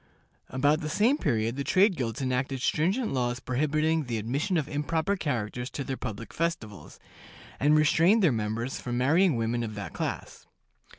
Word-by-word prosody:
About 145 +4 +2
the 155 - -3
same 240 - +2
period 115 - 0
the 140 - -1
trade 190 +5 +3
guilds 125 -2 -3
enacted 130 +1 -1
stringent 195 - +1
laws 120 -1 -1
prohibiting 155 +5 0
the 120 -2 -2
admission 135 - -1
of 150 -3 -1
improper 160 +6 -1
characters 125 - -3
to 140 - -5
their 135 0 -3
public 115 -3 -6
festivals, 110 - -4 0.6
and 150 +2 +4
restraining 165 +8 +4
their 175 -7 +4
members 115 +2 -2
from 120 -1 -3
marrying 155 +6 +3
women 115 +1 -1
of 110 -2 -4
that 100 -5 -6
class. - - -5
135 Hz, 165 wpm, -28 LUFS, 120-160 Hz, 0.6 s, and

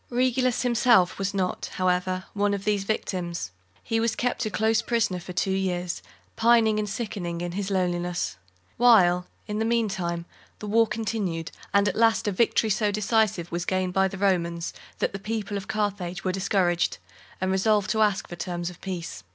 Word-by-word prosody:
Regulus 255 0 +1
himself 235 -7 +4
was 195 0 0
not, 190 -2 -2
however, 185 0 0
one 205 0 +1
of 200 0 -7
these 205 -2 +1
victims. 175 - -3 0.3
He 225 -1 0
was 230 0 +1
kept 245 -1 -1
a - - -2
close 220 +1 +2
prisoner 225 -6 0
for 175 - -8
two 180 +2 0
years, 180 -2 -1 0.3
pining 225 -2 +4
and 210 -1 -2
sickening 195 -6 -4
in 175 0 -3
his 195 +2 -3
loneliness; 175 - -1 0.4
while, 180 -7 +5 0.2
in 210 0 -3
the - - +1
meantime, 195 -7 -1 0.3
the - - -8
war 225 +2 +3
continued, 205 -7 -3 0.2
and 200 0 +4
at 190 - 0
last 225 -1 +3
a - - +2
victory 220 +2 +2
so 210 +1 +2
decisive 210 -4 +1
was 170 0 -2
gained 185 0 -1
by 190 0 +3
the 195 - -7
Romans, 170 -4 0 0.2
that - - -1
the 195 - -4
people 210 0 -3
of 200 0 -4
Carthage 195 -4 -2
were 185 - +1
discouraged, 185 -2 +1 0.4
and 190 0 0
resolved 205 +1 +2
to 220 - +1
ask 205 -3 +2
terms 175 0 -3
of 180 - -16
peace. 180 -3 -5
195 Hz, 175 wpm, -26 LUFS, 180-220 Hz, 0.4 s, while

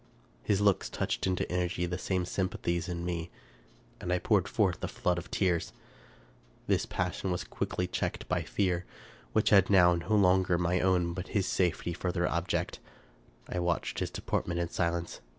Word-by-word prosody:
His 100 +10 +1
looks 100 -2 +3
touched - - -1
into 95 -1 0
energy 90 0 0
the 90 +1 -3
same 90 -1 -1
sympathies 90 -2 -2
in 85 -1 -3
me, 85 -1 -3 0.7
and 90 - -4
I 90 - +3
poured 95 +1 +2
forth 95 -5 +1
a - - 0
flood 90 -7 0
of 85 - -10
tears. 90 -4 0 0.9
This - - +1
passion 90 +1 -2
was 90 -1 -1
quickly 90 - -2
checked 90 - -3
by 90 -1 0
fear, 90 +1 0 0.5
which 110 - +3
had 95 -3 +6
now 90 -3 +6
no 85 +6 0
longer 95 -2 +4
my 90 +1 +1
own 90 -2 +2
but 90 +1 -5
his 95 - +2
safety 85 -2 0
for 90 +1 -2
their 85 -1 0
object. 85 +1 -1 0.7
I 90 - -3
watched 85 -1 -1
his - - -1
deportment 85 -1 -2
in 85 -1 -1
silence. 85 -1 -2
90 Hz, 170 wpm, -30 LUFS, 85-95 Hz, 0.9 s, had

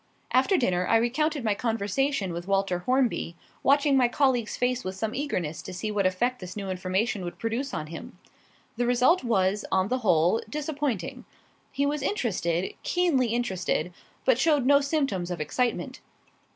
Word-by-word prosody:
After 265 +10 +3
dinner 180 -7 +1
I - - +3
recounted 280 +5 0
my 215 -2 +2
conversation 225 0 -1
with 175 +2 -6
Walter 195 -2 +1
Hornby, 250 -9 +1 0.3
watching 280 0 +4
my 255 -2 +5
colleague's 245 -3 +1
face 250 0 0
with 185 0 -4
some 220 +3 -3
eagerness 180 - -2
to 185 - -8
see 215 +4 -3
what 200 -2 +2
effect 245 +7 0
this 185 0 -8
new 195 -2 -3
information 185 +3 -1
would 175 - -6
produce 235 +5 -2
on 155 - -3
him. 165 +2 -9 0.6
The 240 0 +1
result 250 +8 +3
was, 200 -3 +1
on 190 +1 +2
the 255 - 0
whole, 180 -1 +3
disappointing. 290 - -3 0.5
He 280 +1 0
was 290 0 -1
interested, 190 - -1
keenly 335 -9 +2
interested, 190 -6 -1 0.3
but - - +4
showed 295 -6 +3
no 280 +1 +5
symptoms 275 - -1
of 175 -2 -4
excitement. 235 - -1
230 Hz, 165 wpm, -27 LUFS, 185-270 Hz, 0.6 s, my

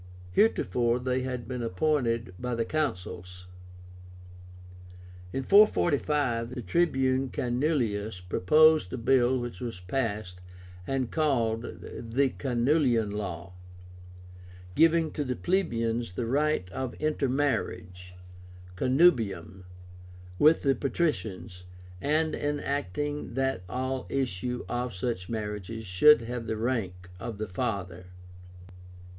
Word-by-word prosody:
Heretofore 120 - +2
they 125 +1 -1
had 125 -2 -4
been 125 -1 -4
appointed 115 -1 0
by 125 -1 -2
the 115 0 -1
Consuls. 90 - -4 1.9
In 135 - -2
445 145 - +3
the 125 - -5
Tribune 130 - +1
Canuleius 120 - -1
proposed 150 - +4
a - - -3
bill 130 +1 +3
which 120 -6 -5
was 115 -6 -5
passed, 100 -2 -3 0.5
and 130 -3 -1
called 120 -7 0 0.2
the 125 +4 +1
CANULEIAN 125 -4 +1
LAW, 95 -3 -5 1.2
giving 165 - +4
to 150 - -2
the 130 -2 -2
plebeians 115 - -1
the 115 - -2
right 145 -4 +1
of 130 +4 -4
intermarriage 125 -12 -2 0.6
(connubium) 105 - +2 0.7
with 155 +2 +5
the 135 -2 +4
patricians, 110 - -2 0.4
and 155 +2 +1
enacting 145 -2 -2
that 135 -5 0
all 130 0 -3
issue 125 -2 -2
of 120 -3 -3
such 90 -2 -3
marriages 110 0 -4
should 115 +11 +6
have 120 0 -5
the 110 0 -2
rank 95 -7 -3
of 115 +1 -6
the 110 +1 -4
father. 90 -2 -4
120 Hz, 105 wpm, -28 LUFS, 100-140 Hz, 1.9 s, should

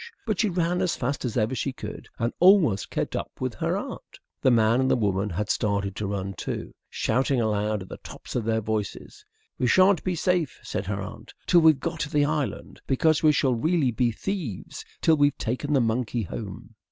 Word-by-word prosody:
But 215 -5 -1
she 215 - +3
ran 175 0 0
as 180 -2 +1
fast 140 -1 -2
as 120 0 -2
ever 110 +2 +1
she 135 +1 -1
could, 105 -4 -8
and 115 +1 -1
almost 175 - +5
kept - - -2
up - - -5
with - - -2
her - - -1
aunt. - - -8 0.2
The - - +4
man 115 0 +4
and 130 0 +2
the - - +4
woman 100 -3 0
had 105 +4 -2
started 100 -2 -1
to 105 - -2
run 100 -1 -3
too, - - -5 0.2
shouting 130 +3 +1
aloud 105 -2 0
at 95 - -14
the - - -7
tops - - -10
of 120 - 0
their 110 0 0
voices. 105 -2 -4 0.4
"We 125 - +2
shan't 185 +5 +5
be 185 -1 -1
safe," 175 -3 0
said 95 - -4
her 100 -1 -2
aunt, 100 - -10
"till 175 - +5
we've 160 -4 +5
got 165 +1 -4
to 150 - -2
the 145 -1 +2
island; 150 -2 -3
because 155 +3 +3
we 155 - +6
shall 135 -3 +2
really 150 +2 +1
be 120 +2 +1
thieves 145 - -5 0.2
till 160 -1 +4
we've 145 -1 +3
taken 130 +6 -2
the 140 - +4
monkey 115 0 0
home." 105 +3 -7
125 Hz, 210 wpm, -26 LUFS, 105-155 Hz, 0.4 s, we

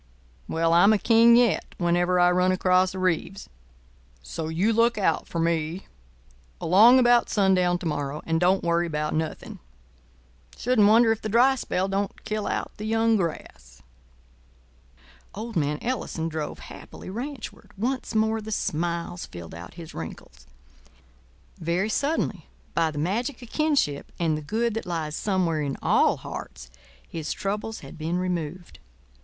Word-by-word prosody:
Well, 165 0 +1
I'm 200 +5 +6
a - - +3
King 230 +2 +5
yet 240 -2 +2
whenever 175 +1 +2
I 175 0 +5
run 180 +1 +3
across 185 0 +2
a - - -5
Reeves. 185 +2 -1 0.8
So 155 - -5
you 180 +8 +1
look 230 0 +3
out 200 - 0
for - - -6
me 165 +1 -1 0.7
along 215 +9 +6
about 240 -1 +4
sundown 185 -3 +2
to 175 - -9
morrow, 150 -1 -3
and 165 0 0
don't 185 +2 +2
worry 170 0 +1
about 150 -1 -2
nothing. 160 0 -4 1.0
Shouldn't 235 -4 +3
wonder 225 +2 +5
if 225 - -1
the 215 - -4
dry 245 +5 +5
spell 190 -7 -2
don't 195 +1 -3
kill 215 -1 -2
out - - -2
the 210 - -6
young 225 +1 +2
grass." 65 - -5 1.5
Old 225 +2 -6
man 150 -2 0
Ellison 220 -9 -2
drove 155 -2 -4
happily - - -10
ranchward. 255 +4 -7
Once 250 +3 -2
more 220 0 +1
the 215 +1 -7
smiles 170 -1 -2
filled 85 -1 -10
out 85 +1 -10
his 165 -2 -10
wrinkles. 65 -5 -9 1.1
Very 175 +5 0
suddenly, 285 +8 -1 0.3
by 165 -1 +2
the 150 - -7
magic 230 - -1
of 240 - -12
kinship 290 - 0
and 165 -3 +1
the 155 - -4
good 225 +9 -1
that 225 -3 -4
lies 160 -3 -3
somewhere 180 -6 0
in 140 -2 -3
all - - +3
hearts, - - -9 0.4
his 160 -2 -5
troubles 210 +3 -3
had 135 +2 -11
been 165 +3 -1
removed. 180 -1 -4
180 Hz, 150 wpm, -25 LUFS, 160-220 Hz, 1.5 s, I'm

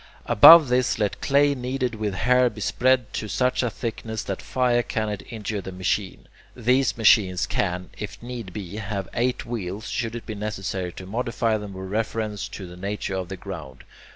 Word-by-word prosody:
Above 150 +7 +9
this 125 0 +2
let 105 -2 -1
clay 145 0 +3
kneaded 125 -1 -2
with 105 -3 -3
hair 125 +5 +3
be 110 -1 -11
spread 125 +3 +1
to 110 - -3
such 125 +5 +1
a 120 - 0
thickness 110 -1 -5
that 95 - -4
fire 125 -2 +1
cannot 110 -3 -3
injure 105 -2 -4
the 95 - -7
machine. 95 +1 -2 0.3
These 125 +2 +2
machines 100 -5 +4
can, 90 -2 -2
if - - -6
need 120 -5 -7
be, 100 0 -7
have 100 -2 -4
eight 125 +1 0
wheels, 110 -2 -5
should 115 -2 -2
it 120 - -7
be 110 - -5
necessary 95 -3 -4
to 95 - -9
modify 115 +1 -1
them 105 -1 -7
with 95 0 -7
reference 110 -1 -2
to 95 - -8
the 90 0 -11
nature 100 +1 -4
of 95 -2 -3
the 95 - -5
ground. 80 -10 -8
110 Hz, 180 wpm, -24 LUFS, 95-120 Hz, 0.3 s, Above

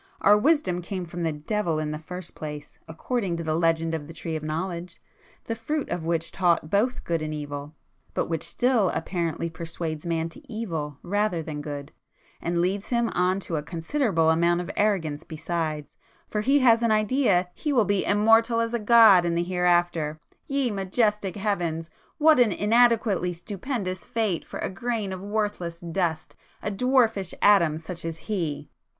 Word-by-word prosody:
Our 205 - +6
wisdom 235 - +2
came 180 +1 -4
from 175 +1 -6
the 165 -1 0
devil 165 +3 -1
in 155 -1 -2
the 150 - -4
first 180 +2 -8
place, 150 -1 -8
according 180 +2 -2
to 165 - -4
the 155 -1 -1
legend 165 0 +1
of 150 -3 -4
the 165 - -9
tree 165 -1 -4
of 155 - -3
knowledge,—the 170 +6 -6
fruit 280 +7 -3
of 170 - -3
which 165 0 -1
taught 170 -3 +1
both 230 +6 +1
good 165 -2 -1
and 155 0 -3
evil, 145 0 -6 0.4
but - - +1
which 160 -2 -2
still 245 -6 +2
apparently 170 0 -2
persuades 160 -1 -5
[p - - -3
220] 165 -1 +1
man 165 +1 -2
to 285 - -12
evil 165 - -4
rather 200 -3 0
than 150 -2 -5
good, 145 -1 -6 0.5
and 170 0 0
leads 195 +3 -1
him 235 -1 +1
on 180 +2 +1
to 165 -4 -3
a - - -1
considerable 165 - +1
amount 170 +1 +2
of 180 +2 -4
arrogance 170 -8 0
besides, 160 -2 -3 0.4
for 210 - -2
he 275 +6 +3
has 230 -2 +5
an 235 - +2
idea 215 -4 +2
he 300 - -3
will 240 -6 +3
be 200 -1 +1
immortal 225 +3 +4
as 230 0 -1
a 235 - 0
god 215 -4 +7
in 170 -1 0
the 170 - +1
hereafter,—ye 175 - 0
majestic 205 0 0
Heavens!—what 200 - 0
an 235 -4 +5
inadequately 215 -3 +3
stupendous 190 +1 -4
fate 220 -8 -1
for - - -7
a - - -1
grain 220 -2 -2
of 185 0 -7
worthless 205 -5 -2
dust,—a 170 +3 -4
dwarfish 225 -4 +2
atom 170 -7 +5
such 170 +2 -8
as 165 -1 -4
he!" 155 -9 -3
180 Hz, 170 wpm, -26 LUFS, 165-215 Hz, 0.5 s, god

